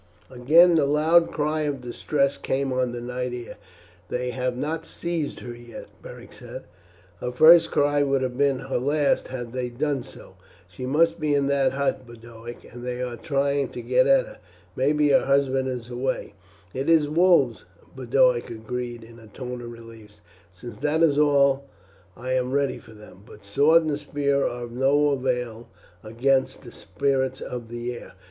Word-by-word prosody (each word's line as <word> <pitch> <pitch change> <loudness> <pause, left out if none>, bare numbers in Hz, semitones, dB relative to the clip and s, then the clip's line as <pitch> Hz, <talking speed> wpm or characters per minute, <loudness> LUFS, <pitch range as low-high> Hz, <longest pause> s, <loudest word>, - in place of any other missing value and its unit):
Again 155 +8 +5
the 155 -4 +3
loud 160 +4 +3
cry 155 +1 -1
of 145 -3 -2
distress 140 +3 -1
came 135 0 -2
on 125 -1 0
the 120 - -5
night 125 +1 -4
air. 120 -3 -8 0.5
"They 125 0 -2
have 125 0 -2
not 155 +4 -3
seized 165 -2 -4
her 120 - -7
yet," 120 -1 -11
Beric - - -12
said. - - -10 0.6
"Her 125 - -3
first 165 +6 +7
cry 145 0 +2
would 135 -2 +1
have 125 -1 -3
been 140 0 +2
her 135 -2 -2
last 145 +2 +1
had 120 -2 -7
they 125 -1 -3
done 140 +2 -2
so. - - -14 0.3
She 125 - -7
must 160 +6 +2
be 150 -2 +1
in 140 -1 +1
that 135 -2 +2
hut, 135 -2 -2
Boduoc, 120 0 -11
and 120 0 -9
they 125 0 -4
are 125 -1 -4
trying 140 +1 -1
to - - -7
get - - +3
at - - +4
her. - - -14 0.4
Maybe 150 +3 +2
her 140 - +4
husband 135 -1 +1
is 125 -2 -5
away." 125 -4 -3 0.4
"It 135 +4 -2
is 160 -3 +4
wolves," 175 +4 +3 0.3
Boduoc - - +2
agreed 120 +1 -6
in 115 +1 -14
a 110 - -15
tone 125 +3 -7
of 120 0 -8
relief. 115 -3 -14 0.3
"Since 105 +4 -11
that 150 +5 +1
is 150 -3 +3
all 140 -2 +3 0.5
I 130 +1 -3
am 130 0 0
ready 140 -1 0
for - - -16
them; 105 -3 -15
but 105 -1 -16
sword 145 +11 +4
and 150 -2 -2
spear 140 -1 0
are 120 0 -5
of 120 - -8
no 140 +4 +2
avail 125 -3 -3 0.3
against 130 +5 0
the - - -11
spirits 130 -1 -2
of 120 -2 -7
the 120 +1 -4
air. - - -11
130 Hz, 180 wpm, -24 LUFS, 120-145 Hz, 0.6 s, first